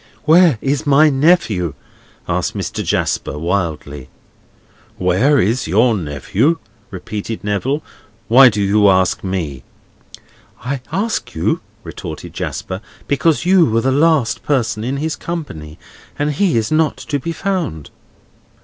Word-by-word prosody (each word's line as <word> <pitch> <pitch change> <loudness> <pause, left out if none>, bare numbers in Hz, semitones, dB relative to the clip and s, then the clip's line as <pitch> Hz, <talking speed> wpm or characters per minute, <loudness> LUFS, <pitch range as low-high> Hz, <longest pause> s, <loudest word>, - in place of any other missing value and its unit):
"Where 165 -3 +5
is 145 +2 -1
my 150 +2 +5
nephew?" 135 - +2 0.5
asked - - -1
Mr. - - -3
Jasper, 75 - -1
wildly. 75 -6 -3 0.9
"Where 95 +11 +2
is 115 +7 0
your 110 +7 +3
nephew?" 95 - 0 0.3
repeated 105 +4 -6
Neville, 125 +9 -1 0.4
"Why 130 +3 +8
do 105 -2 -1
you 100 +1 +4
ask 95 -1 +2
me?" 85 -9 -3 1.0
"I 135 0 -2
ask 210 +7 -2
you," 80 - 0 0.2
retorted - - -8
Jasper, 95 +1 -5 0.3
"because 155 +3 +1
you 185 -2 +5
were 115 0 +1
the 130 - +1
last 145 -3 +2
person 120 -6 -1
in 130 +4 -2
his 155 +2 -2
company, 80 - -6 0.4
and 145 +1 0
he 160 -2 +1
is 110 +3 -1
not 155 0 +2
to 145 -2 -3
be 165 +6 -4
found." 170 - -3
120 Hz, 130 wpm, -17 LUFS, 95-150 Hz, 1.0 s, Why